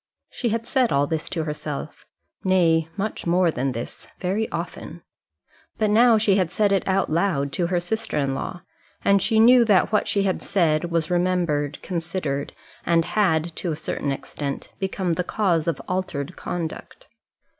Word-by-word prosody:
She 240 - -2
had 230 +1 -2
said 255 -1 +1
all 140 +1 +3
this 160 +1 -3
to 165 -3 -2
herself, 150 -1 -6 0.4
nay, 165 -4 +3
much 205 -2 -3
more 175 0 +3
than 135 -1 -1
this 115 0 -7
very 200 +4 -1
often. - - -6 0.7
But 215 -1 +1
now 230 +1 +6
she 210 -2 +3
had 185 -4 +1
said 205 +3 +1
it 195 - +1
out 195 -3 +1
loud 155 -5 +1
to 170 +4 -1
her 175 0 +1
sister 220 +1 -3
in 140 -2 0
law; 175 +6 -5 0.4
and 200 0 +4
she 220 - +1
knew 240 +2 +7
that 200 -4 +3
what 210 - +2
she 200 - +1
had 190 -2 0
said 170 -5 +1
was 165 0 -1
remembered, 175 -5 0
considered, 165 -5 -3 0.3
and 165 -1 +2
had, 170 -5 +1
to 175 - -2
a - - -2
certain 150 -2 -3
extent, 140 +1 -5
become 190 -2 -1
the 180 - -1
cause 175 -5 0
of 170 - 0
altered 180 -4 -3
conduct. 165 -3 -6
175 Hz, 170 wpm, -23 LUFS, 155-200 Hz, 0.7 s, knew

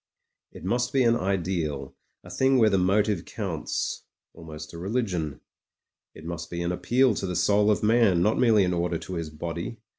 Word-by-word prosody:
It - - -12
must 120 +6 -1
be 135 -2 +3
an 115 -1 +4
ideal, 85 - -2 0.3
a - - -12
thing 135 0 +3
where 110 -3 +4
the 95 - +3
motive 100 0 +1
counts, - - -4 0.3
almost 75 -2 -10
a 85 - -8
religion. 90 - -2 0.7
It 80 - -12
must 85 0 -5
be 85 0 -4
an 85 - -1
appeal 125 +7 +2
to 95 - -3
the 90 - -3
soul 100 +4 +3
of 105 - +1
man, 105 -6 +4
not 110 - +2
merely 110 -5 +4
an 90 - 0
order 85 -1 -1
to 95 - -8
his 85 -3 -4
body. 85 +7 -5
95 Hz, 185 wpm, -26 LUFS, 85-110 Hz, 0.7 s, an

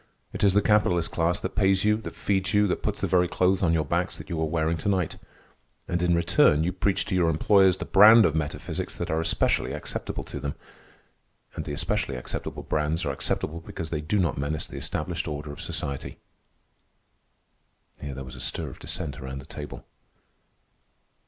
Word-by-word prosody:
It - - -4
is 100 -2 +5
the 105 0 +3
capitalist 90 -6 +2
class 85 +1 +1
that 95 - -3
pays 95 -1 +3
you, 105 0 +4
that 110 - -8
feeds 95 -1 0
you, 105 0 +5
that 90 - -1
puts 105 -1 -2
the - - +1
very 90 -1 +3
clothes 90 +2 +2
on 85 -3 +3
your 80 -2 +1
backs 85 +5 -1
that - - -10
you 80 -2 -2
are - - +2
wearing 80 +1 0
to 90 - -2
night. 95 -5 0 0.7
And 85 0 -1
in 90 -1 +3
return 85 -2 +4
you 90 - +1
preach 95 +1 0
to - - -4
your 90 -3 +3
employers 95 +3 +4
the - - -5
brands 110 +1 +8
of 80 - +2
metaphysics 75 -2 -3
that 85 -1 -4
are 80 - +1
especially 80 0 +1
acceptable - - -4
to - - -7
them; 70 - -4 1.0
and - - -5
the 75 - -4
especially 85 -1 -1
acceptable 65 - -5
brands 75 +2 -1
are 70 - 0
acceptable 75 +4 -2
because 80 -1 -7
they 75 -2 -1
do 75 +8 0
not 85 -7 +1
menace 75 +2 -2
the - - -9
established 85 +3 -3
order 75 -1 -5
of 70 - -8
society." 70 -1 -4 1.8
Here 70 -2 -5
there 65 - -6
was 65 -1 -9
a 60 - -8
stir - - -2
of - - -12
dissent 70 - -5
around 65 +1 -6
the 65 - -9
table. - - -8
85 Hz, 195 wpm, -26 LUFS, 75-95 Hz, 1.8 s, brands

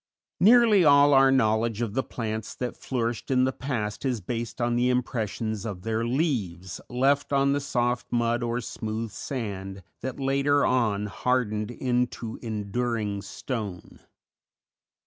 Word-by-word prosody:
Nearly 220 -2 +6
all 145 -1 +6
our 135 0 +6
knowledge 110 -3 +2
of 115 -4 -2
the 135 - +1
plants 110 -4 -5
that 125 -1 -4
flourished 120 -3 -3
in 130 -1 +3
the 130 - +2
past 115 -7 -3
is 130 -4 0
based 115 +4 -5
on 120 0 +1
the 125 +1 +2
impressions 110 -4 -2
of 100 -5 -6
their 115 0 -1
leaves 110 - -2
left 135 +4 +1
on 140 0 +3
the 145 - +1
soft 125 -3 -1
mud 120 0 +1
or 120 +1 -1
smooth 110 0 -4
sand 100 -7 -5 0.2
that 130 +1 -5
later 140 +1 +2
on 110 -5 +1
hardened 110 -1 -1
into 120 -2 -2
enduring 110 -1 -2
stone. 105 -4 -6
120 Hz, 140 wpm, -26 LUFS, 110-130 Hz, 0.2 s, Nearly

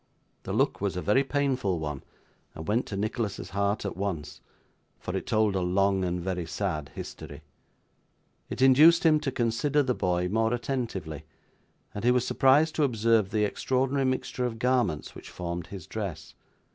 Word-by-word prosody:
The - - -4
look - - +1
was 100 -2 -1
a - - -2
very 120 +7 +3
painful 135 -9 0
one, 75 -3 -4 0.5
and 80 - -8
went 115 +4 +1
to 100 - -4
Nicholas's 105 -3 -3
heart 100 +1 0
at 100 - -3
once; 95 -5 -4 0.6
for - - -5
it - - -4
told 110 -2 +2
a - - +1
long 95 +1 +2
and 90 0 -1
very 90 -1 -3
sad 80 -6 -3
history. 75 +1 -8 1.1
It 130 - -1
induced 155 +6 +7
him 155 -1 +5
to 140 - -2
consider 130 +5 +1
the 130 -1 0
boy 90 -4 0
more 110 +4 +1
attentively, 115 - -4 0.7
and 105 - -6
he 120 - +4
was 125 -1 +3
surprised 145 +4 +4
to 155 - +3
observe 115 -5 +2
the 105 0 +1
extraordinary 130 +5 0
mixture 130 -1 -1
of 115 -2 -6
garments 120 - 0
which - - -11
formed 85 -1 -5
his 95 -4 -8
dress. 95 -8 -6
105 Hz, 170 wpm, -27 LUFS, 90-130 Hz, 1.1 s, induced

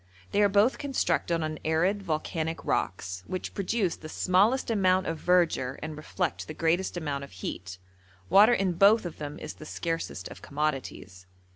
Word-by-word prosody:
They 205 - +2
are 205 - +5
both 205 +6 +3
constructed 170 - 0
on 155 0 -3
arid, 175 +6 +1
volcanic 160 -1 -3
rocks, 90 0 -2
which 185 - -4
produce 200 -2 0
the 155 - -9
smallest 205 +11 +2
amount 185 -3 +3
of 165 -1 -3
verdure 170 -7 +2
and 155 0 -5
reflect 160 +3 -3
the 155 - -7
greatest 170 +3 0
amount 145 -4 -3
of 140 - -9 0.2
heat; 95 0 -5 0.5
water 205 - +7
in 195 -5 +1
both 200 +4 +5
of 175 - -6
them 150 -1 -5
is 155 - -7
the 155 - -12
scarcest 165 - -3
of - - -11
commodities. 135 -11 -4
165 Hz, 165 wpm, -28 LUFS, 155-195 Hz, 0.5 s, water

